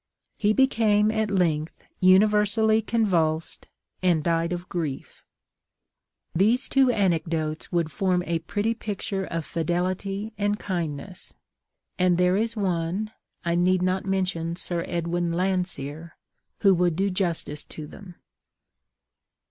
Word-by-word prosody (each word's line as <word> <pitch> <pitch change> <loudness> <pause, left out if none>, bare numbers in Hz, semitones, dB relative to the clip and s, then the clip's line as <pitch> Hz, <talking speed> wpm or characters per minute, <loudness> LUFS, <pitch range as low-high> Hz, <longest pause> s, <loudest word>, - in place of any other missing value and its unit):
He 210 -1 +2
became, 215 -4 +3
at 220 -1 0
length, 165 -5 0 0.2
universally 210 +3 +4
convulsed, 175 -9 0 0.3
and 175 -4 +2
died 165 0 +1
of 175 +1 -4
grief. 160 -7 -5 1.1
These 220 +9 +2
two 270 -1 +4
anecdotes 165 -7 0
would 170 -3 0
form 185 -2 +1
a 170 -1 -1
pretty 205 +7 -1
picture 200 -3 -4
of 165 -3 -4
fidelity 185 +5 -2
and 205 0 +1
kindness, 175 -2 -5 0.6
and 180 -1 +3
there 180 +1 +3
is 225 +3 0
one 190 +1 -1 0.3
(I 170 - +1
need 180 +1 +2
not 185 +1 0
mention 180 -3 -1
Sir 175 -1 -2
Edwin 170 0 -1
Landseer) 170 -4 -2 0.5
who 195 -2 +6
would 175 -2 +2
do 195 +3 0
justice 170 -5 -1
to 155 - -8
them. 180 +3 -12
185 Hz, 120 wpm, -25 LUFS, 170-205 Hz, 1.1 s, who